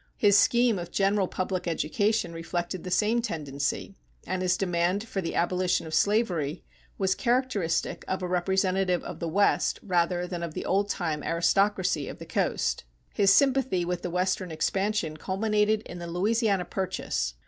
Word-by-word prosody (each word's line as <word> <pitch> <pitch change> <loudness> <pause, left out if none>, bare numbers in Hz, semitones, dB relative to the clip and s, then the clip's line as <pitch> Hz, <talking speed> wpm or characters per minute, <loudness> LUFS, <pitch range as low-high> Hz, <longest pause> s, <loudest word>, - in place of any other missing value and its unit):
His 205 -2 +4
scheme 235 +1 +4
of 175 - -6
general 195 -1 +1
public 185 0 -3
education 200 +5 0
reflected 175 +1 -4
the 185 - -5
same 215 +5 +2
tendency, 150 - -3 0.3
and 185 0 -2
his 185 0 +2
demand 180 +3 0
for 195 - -3
the 165 - -4
abolition 180 0 +1
of 160 - -7
slavery 175 -5 +1 0.3
was 190 -1 +2
characteristic 235 -10 0
of 190 0 -2
a - - -1
representative 185 0 +1
of - - -7
the 170 - -3
West 200 +5 +2
rather 175 -2 +1
than 175 -1 -5
of 170 -2 -5
the - - -4
old 200 +2 +1
time 160 -6 -2
aristocracy 180 -1 +1
of - - -7
the - - -9
coast. - - -1 0.3
His 195 -2 +4
sympathy 260 -7 +3
with 175 0 -2
the 180 - -3
Western 185 +1 -1
expansion 190 0 -1
culminated 210 +4 +1
in 175 - -9
the 170 - -6
Louisiana 200 +2 +1
Purchase. 60 - -2
185 Hz, 160 wpm, -27 LUFS, 170-205 Hz, 0.3 s, His